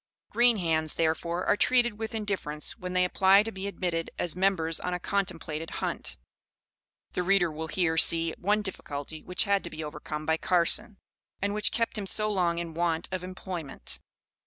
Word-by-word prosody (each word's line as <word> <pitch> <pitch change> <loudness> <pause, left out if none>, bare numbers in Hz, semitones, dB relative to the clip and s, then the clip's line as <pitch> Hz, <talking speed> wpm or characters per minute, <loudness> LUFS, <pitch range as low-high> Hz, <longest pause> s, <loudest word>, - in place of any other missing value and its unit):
Green 240 -1 +4
hands, 160 -4 0
therefore, 170 +2 0
are - - +4
treated 240 -1 +3
with 225 +1 -4
indifference 195 -8 -3
when 180 -4 -6
they 180 0 +3
apply 190 +2 +5
to 225 - -5
be 190 0 -5
admitted 175 -4 -2
as 170 - -2
members 180 -4 +1
on 180 0 -2
a - - -3
contemplated 165 -5 -2
hunt. - - -3 1.0
The - - 0
reader 180 -2 +3
will 160 +1 -5
here 160 0 0
see 165 0 +5
one 210 +3 +1
difficulty 155 -5 -6
which 180 - +1
had 200 -2 +1
to - - -4
be 155 0 -6
overcome 150 0 -6
by 160 0 +2
Carson, 190 +6 +3 0.4
and 200 +1 -1
which 210 0 +1
kept 230 -2 -1
him 200 - -4
so 215 +2 +2
long 175 -4 +1
in 170 -1 -4
want 165 0 -1
of 185 -1 -3
employment. 180 - -6
180 Hz, 180 wpm, -28 LUFS, 160-200 Hz, 1.0 s, apply